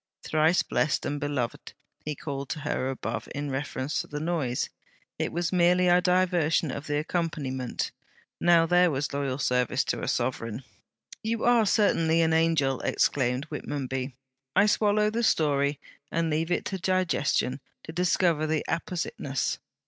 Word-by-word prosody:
"Thrice 160 +3 +3
blessed 155 - 0
and 145 - -2
beloved!" 145 -5 -3 0.3
he 150 0 -3
called 140 -1 -5
to 150 - -4
her 130 -1 -1
above, 135 - -4
in 145 0 -3
reference 135 +1 -2
to - - -10
the 150 - -5
noise, 150 -6 -1 0.5
"it - - -1
was 175 +2 -1
merely 180 0 +4
a 175 0 +5
diversion 180 -4 +2
of 140 +3 -6
the 145 -1 0
accompaniment." 150 -6 -2 0.5
Now 170 -1 +5
there 180 +1 +4
was 145 -1 -2
loyal 140 -2 -1
service 125 -3 +1
to - - -2
a - - -3
sovereign!' 120 -1 -2 0.6
'You 225 +1 -2
are 235 -3 +4
certainly 165 -6 +3
an 160 0 +2
angel!' 160 -5 +2
exclaimed 130 0 +1
Whitmonby. 135 -3 -4 0.4
'I 200 +2 +6
swallow 210 0 +2
the 230 +2 -1
story, 145 -8 +2 0.3
and 165 -1 0
leave 160 +2 0
it 175 - 0
to 190 - -3
digestion 175 -8 +1 0.2
to - - -7
discover 175 -2 +2
the 155 -1 0
appositeness. 160 -6 -2
155 Hz, 150 wpm, -27 LUFS, 140-175 Hz, 0.6 s, I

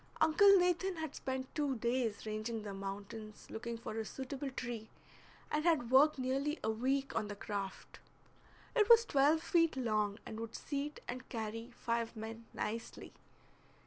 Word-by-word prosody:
Uncle 390 +6 +7
Nathan 360 +1 +2
had 315 -3 -4
spent 260 0 -4
two 290 -3 0
days 235 -2 -1
ranging 215 +1 -3
the 205 -2 -5
mountains 205 +2 -7
looking 235 +1 -4
for 225 -1 -6
a - - -1
suitable 265 +4 -5
tree, 235 -4 -5 0.6
and 305 0 +1
had 310 -8 +2
worked 285 +3 +6
nearly 270 +4 0
a 220 - +2
week 265 +5 0
on 210 - 0
the 205 - -5
craft. 200 -1 -5 0.8
It 435 -2 +4
was 465 0 +9
twelve 295 +2 +4
feet 330 -4 +3
long, 215 -4 +1
and 220 - -6
would 230 0 -6
seat 285 +1 -4
and 250 +1 -6
carry 225 +1 -4
five 230 0 -1
men 225 +1 -7
nicely. 230 +2 -5
245 Hz, 155 wpm, -35 LUFS, 220-295 Hz, 0.8 s, was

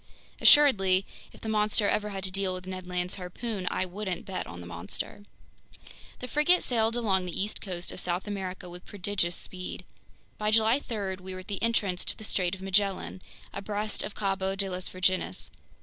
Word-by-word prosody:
Assuredly, 195 -10 +7 0.3
if - - -16
the - - -5
monster 210 -1 +3
ever 210 0 +1
had 195 -2 -4
to 190 - -2
deal 190 -1 0
with 185 0 -7
Ned 185 -1 -6
Land's 180 0 -1
harpoon, 190 +2 -4
I 185 - 0
wouldn't 185 -1 -4
bet 190 -1 -4
on 85 +1 -8
the 90 - -8
monster. 90 - -5 1.0
The 250 - -6
frigate 305 +7 +4
sailed 225 -2 +2
along 195 -6 +2
the 180 - -4
east 205 +2 -1
coast 180 -3 -3
of - - -7
South 180 +1 0
America 190 -3 -4
with 175 +1 -9
prodigious 190 -3 0
speed. 180 0 -5 0.5
By 210 0 +2
July 225 +4 +5
3 200 -8 -3
we 185 0 -7
were 185 - -6
at 185 - -17
the 200 - -3
entrance 205 -6 +1
to - - +1
the - - -9
Strait 185 -3 +1
of 190 - -11
Magellan, 195 -1 +1 0.3
abreast 210 +1 -2
of 200 - -5
Cabo 195 -1 0
de 195 0 -1
las 185 0 -4
Virgenes. 185 0 +1
195 Hz, 190 wpm, -29 LUFS, 185-210 Hz, 1.0 s, Assuredly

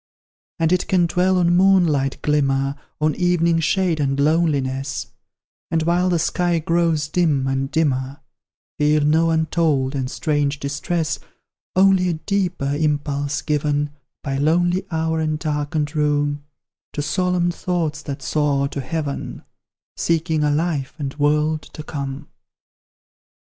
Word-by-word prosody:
And 165 -1 +1
it 180 0 +1
can 180 -2 +3
dwell 180 +2 +2
on 175 -1 +3
moonlight 175 -8 +3
glimmer, 135 -2 +1 0.3
On 155 0 +2
evening 170 -2 +2
shade 175 0 +1
and 140 -1 0
loneliness; 140 -3 0 0.6
And, 165 -1 +1
while 175 +2 +2
the 175 - +2
sky 175 +1 +1
grows 165 -1 +1
dim 155 -5 +1
and 135 0 -1
dimmer, 140 -4 -1 0.6
Feel 150 +1 +3
no 160 +3 +3
untold 160 -4 +1
and 130 -2 -2
strange 145 -1 -1
distress 150 +2 -2 0.6
Only 190 -1 +4
a - - +1
deeper 175 -4 -1
impulse 145 -1 -1
given 145 -1 0 0.3
By 135 -1 -2
lonely 175 +5 +1
hour 160 -1 -1
and 155 -1 0
darkened 150 -1 -2
room, 145 -1 0 0.5
To 145 - -2
solemn 180 +1 +1
thoughts 170 -3 -2
that 140 -2 -6
soar 145 -2 +1
to 140 - -4
heaven 150 0 -4 0.5
Seeking 160 -2 0
a 150 - +2
life 145 -2 -1
and 140 -3 -4
world 150 +1 +2
to 155 - -10
come. 140 -1 -5
155 Hz, 130 wpm, -21 LUFS, 145-170 Hz, 0.6 s, Only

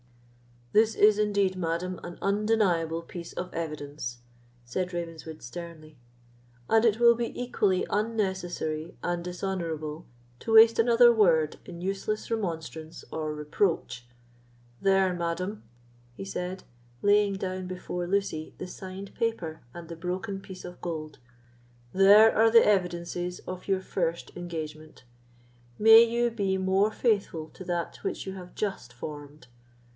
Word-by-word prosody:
"This 220 +1 +4
is 210 0 +5
indeed, 200 -3 +1
madam, 175 +1 -2
an 175 0 -8
undeniable 195 -6 +1
piece 170 0 -8
of 180 - -5
evidence," 145 -6 -5 0.5
said 180 +9 -3
Ravenswood, 165 -2 -6
sternly; 155 +2 -9 0.7
"and 225 +1 +4
it 220 -2 +4
will 235 0 +7
be 235 0 -4
equally 210 -7 +1
unnecessary 190 -7 -2
and 175 -1 -1
dishonourable 170 -4 -4 0.3
to 225 - -3
waste 225 +1 +8
another 235 +1 +6
word 165 -8 +3
in 170 -1 -9
useless 195 +4 -3
remonstrance 165 -6 -4
or 155 -1 -3
reproach. 150 -5 -1 0.7
There, 195 -1 +3
madam," 175 +4 -3 0.5
he 95 -3 -7
said, 180 - -5 0.4
laying 205 0 +4
down 185 -1 -4
before 180 -1 -4
Lucy 185 -5 -2
the - - -5
signed 190 +2 -8
paper 225 -9 -2
and 170 -1 -9
the 170 0 -8
broken 185 +4 -4
piece 190 -1 -10
of 180 0 -10
gold—"there 125 - +2
are 225 +1 +5
the 230 0 +7
evidences 180 -2 0
of 185 0 -8
your 190 -1 +1
first 170 -3 -2
engagement; 155 -4 -7 0.7
may 225 +1 +9
you 235 +1 +2
be 195 -4 0
more 190 +2 +2
faithful 200 -9 0
to 185 - -11
that 175 -1 -3
which - - -4
you 190 - -5
have 180 -2 -10
just 195 - -3
formed. 145 +2 -9
180 Hz, 130 wpm, -28 LUFS, 160-205 Hz, 0.7 s, may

